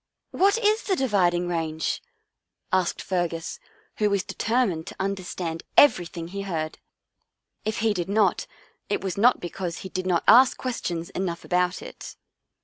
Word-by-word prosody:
"What 395 +3 +3
is 430 0 +2
the 390 - 0
Dividing 180 - +2
Range? 160 -2 -2 0.3
" - - -60 0.3
asked 185 -2 +1
Fer 180 -2 0
gus, 165 0 -6 0.4
who 210 -1 +2
was 200 -2 +1
determined 220 -9 0
to - - -8
understand 180 -4 -3 0.2
every 220 -12 +6
thing 165 0 -7
he 200 +2 -5
heard. 160 -5 -4 0.9
If 215 0 -2
he 220 -1 +3
did 180 -2 -3
not, 210 0 +2 0.4
it - - 0
was 190 -3 -2
not 240 +5 +4
be 175 - -5
cause 175 -3 -4
he - - -5
did 185 0 -3
not 175 -2 +2
ask 250 +4 +7
questions 175 -9 -3
enough 175 -2 -3
about 180 0 0
it. - - -9
185 Hz, 165 wpm, -25 LUFS, 170-215 Hz, 0.9 s, ask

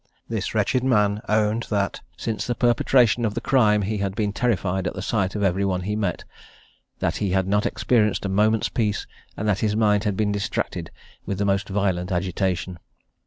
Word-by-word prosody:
This 110 -2 -3
wretched 125 +4 +1
man 105 -5 +2
owned 110 +2 +1
that 100 -2 -1 0.2
since 110 -2 -3
the 120 - -1
perpetration 120 0 +3
of 105 -2 -1
the - - 0
crime 105 -6 +3
he 105 +1 -2
had 100 -1 -2
been 105 -2 -1
terrified 95 -6 0
at - - -4
the 95 - -4
sight 100 -3 0
of 105 - -1
every 95 0 +1
one 95 -2 0
he 105 +3 -2
met, 100 -5 -2 0.7
that - - -1
he 100 - -1
had 95 0 +1
not 105 +1 +2
experienced 105 -4 +1
a - - +1
moment's 105 +3 +2
peace, 105 -4 -1 0.3
and 105 - -2
that 105 -1 +2
his 105 -1 0
mind 105 -2 +3
had 100 -2 0
been 105 -1 +1
distracted 100 0 -3 0.4
with 100 - -2
the 100 - 0
most 100 0 0
violent 95 -2 -1
agitation. 90 0 -1
105 Hz, 195 wpm, -23 LUFS, 95-110 Hz, 0.7 s, perpetration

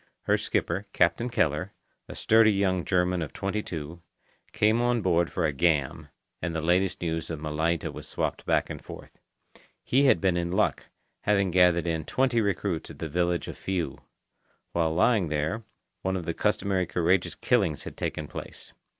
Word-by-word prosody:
Her - - +3
skipper, 95 +5 -1
Captain 85 +9 +2
Keller, 90 -1 0 0.3
a - - -8
sturdy 110 0 +5
young 95 -3 +1
German 90 -1 +1
of 80 - -5
twenty 100 +2 -2
two, 80 -2 -7 0.5
came 110 +2 +2
on 120 -2 +1
board 85 -2 +2
for 90 - 0
a 75 - 0
"gam," 75 -3 +1 0.3
and 85 -1 -3
the - - 0
latest 90 +3 +1
news 80 -1 -2
of 80 -2 -4
Malaita 80 +2 -1
was - - -8
swapped - - -2
back - - +2
and - - -8
forth. - - -11 0.6
He 135 +3 +3
had 135 - +5
been 95 -3 +1
in 85 0 -1
luck, 95 - 0 0.4
having 100 -3 +2
gathered 90 -1 +4
in 80 -2 -1
twenty 130 +1 +1
recruits 100 -4 -1
at - - -10
the 80 - -4
village 85 +2 0
of - - -8
Fiu. 95 -3 -3 0.7
While 80 -2 0
lying 100 0 +3
there, 80 +9 -2 0.4
one 95 0 -1
of 85 - -5
the 85 - -2
customary 100 -3 0
courageous 90 +2 +1
killings 75 -3 +1
had - - -8
taken 75 - -3
place. - - -9
90 Hz, 175 wpm, -27 LUFS, 80-100 Hz, 0.7 s, sturdy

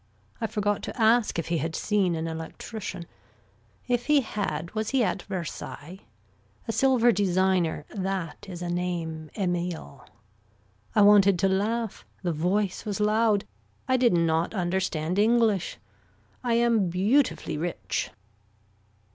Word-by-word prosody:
I 225 - 0
forgot 205 -2 -1
to - - -7
ask 225 -1 +3
if 165 -1 -3
he 170 -1 +1
had 160 +2 -3
seen 195 -5 +1
an 160 0 -3
electrician. 175 +3 -6 0.8
If 245 -1 0
he 300 -2 +5
had 170 - -3
was 215 0 -2
he 265 -2 +2
at 190 -2 -1
Versailles. 180 -2 -6 0.7
A - - 0
silver 240 +1 +4
designer 185 -5 +1
that 190 -3 -4
is 175 -1 -6
a 175 - -3
name, 170 -3 -3
Emile. 175 - -3 0.9
I 210 - +6
wanted 200 -2 +6
to 195 +2 +2
laugh. 215 +3 -1 0.2
The 175 -2 0
voice 185 +5 0
was 205 -2 -3
loud. 215 -1 +2 0.4
I 260 - +3
did 250 -4 +4
not 165 +3 +1
understand 180 -1 -1
English. 220 -3 +2 0.7
I 240 -2 +1
am 230 -5 +3
beautifully 190 - +1
rich. 100 - -2
190 Hz, 130 wpm, -27 LUFS, 170-220 Hz, 0.9 s, I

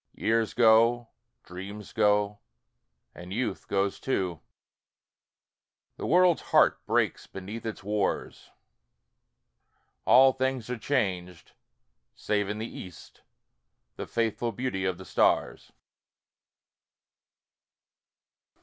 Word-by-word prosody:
Years 115 0 0
go, 115 0 +4 0.3
dreams 100 +4 -9
go, 105 -1 +2 0.7
and 90 +1 -11
youth 120 +5 -3
goes 100 0 -1
too, 90 - -2 1.6
The - - -4
world's 180 -2 +4
heart - - +3
breaks - - 0
beneath 105 +5 -7
its 110 - -6
wars, 105 0 -2 1.6
All 130 +1 +7
things 130 -2 -2
are 125 - -4
changed, 95 - -2 0.6
save 105 -2 -1
in 105 - -3
the 110 - -4
east 90 -6 -11 0.7
The - - -6
faithful 115 0 -1
beauty 110 -4 -3
of 95 -2 -1
the 95 - -11
stars. - - +1
105 Hz, 95 wpm, -28 LUFS, 95-120 Hz, 1.6 s, All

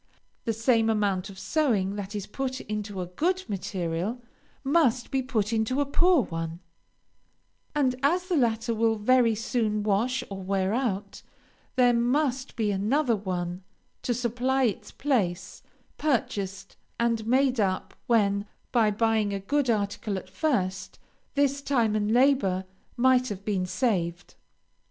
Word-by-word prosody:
The 225 - +1
same 225 0 +2
amount 200 -3 0
of 195 - -11
sewing 210 -9 +1
that 205 0 -5
is 205 -2 -3
put 260 +3 -4
into 210 -2 -4
a - - -3
good 355 - -1
material, 190 +1 -3 0.4
must 270 -5 +2
be 270 -1 +1
put 230 -4 -1
into 225 +4 +1
a 285 - +2
poor 340 +1 +4
one, 165 -2 -5 1.2
and, 265 -4 +2
as 340 +6 +2
the 365 - 0
latter 230 -3 +1
will 225 0 +2
very 230 +1 +3
soon 215 -2 -1
wash 220 +5 +1
or 195 -1 -5
wear 190 +1 0
out, 210 -5 -2 0.5
there 245 -1 +5
must 255 +2 0
be 215 -3 0
another 230 +6 +1
one 180 -3 -3 0.4
to 245 - -1
supply 250 +3 0
its 220 -6 -1
place, 200 -11 -1 0.4
purchased 200 -9 -2 0.2
and 230 -2 0
made 260 0 +3
up, 190 -3 0
when, 205 -3 +2 0.2
by 225 -4 +4
buying 215 -1 +1
a - - -2
good 270 +6 0
article 205 -2 -1
at 185 0 -9
first, 190 -7 -1 0.4
this 280 0 +2
time 235 -7 +1
and 210 0 0
labor 235 -7 +3 0.3
might 255 0 +4
have 200 -1 -6
been 190 -4 0
saved. 180 -5 -1
225 Hz, 140 wpm, -27 LUFS, 195-255 Hz, 1.2 s, there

